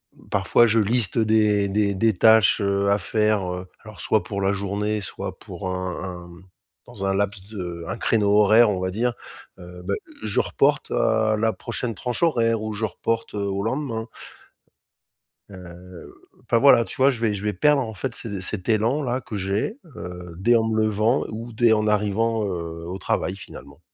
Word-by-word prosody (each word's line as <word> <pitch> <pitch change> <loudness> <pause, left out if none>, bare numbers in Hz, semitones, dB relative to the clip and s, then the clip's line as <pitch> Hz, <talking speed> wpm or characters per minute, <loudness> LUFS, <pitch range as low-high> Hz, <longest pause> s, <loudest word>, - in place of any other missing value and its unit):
mmh, - - -20
parfois, 100 +4 +3
je 115 +1 +3
liste 110 0 +1
des 105 -2 +3
des 100 -1 +1
des 110 0 +2
tâches, 110 -1 +5
heu, 100 0 +1
à 100 - +4
faire, 105 -1 0
heu, 90 +1 -6 0.2
alors 110 -6 -11
soit 110 - +1
pour 100 -3 -4
la 95 +1 +2
journée, 100 +2 -2
soit 95 - -6
pour 95 - -7
un 90 -1 -4
un, 90 -2 -7
mmh, 85 +2 -14 0.4
dans 100 -2 -6
un 95 - +1
laps 100 -1 -2
de 90 -5 -6
un 115 - -4
créneau 105 -3 +1
horaire, 105 +2 +6
on 95 - -2
va 95 0 -2
dire. 120 +4 0 0.5
Heu, 90 0 -11
bah, 100 - -1 0.3
je 105 -2 0
reporte - - +1
à 110 -1 +2
la 110 0 +1
prochaine 120 -2 -4
tranche 125 - -3
horaire 115 -8 +2
ou 110 0 -4
je 105 +2 -5
reporte, 115 +3 -3
heu, - - -2
au 100 0 -2
lendemain. 115 -2 -3 1.4
Heu, 90 -1 -12 0.3
enfin 115 - 0
voilà, 115 -3 +6
tu 145 - -7
vois, 135 +1 +5
je 120 -3 -5
vais 110 -3 +1
je 100 - -5
vais 105 - 0
perdre, 145 +8 +3
en 110 -2 -5
fait, 115 +4 -4
ce 100 -4 -5
cet 95 +1 -3
élan-là 125 +4 +1
que 105 - -7
j'ai, 100 - -2 0.2
heu, 90 -1 -8
dès 120 +5 +4
en 110 - +2
me 110 -1 0
levant 110 +4 +1
ou 115 +2 -7
dès 115 0 +4
en 105 0 0
arrivant, 105 +2 +1
heu, 85 -3 -5
au 95 - -4
travail, 95 +1 -1
finalement. 70 -6 -12
105 Hz, 195 wpm, -23 LUFS, 95-115 Hz, 1.4 s, horaire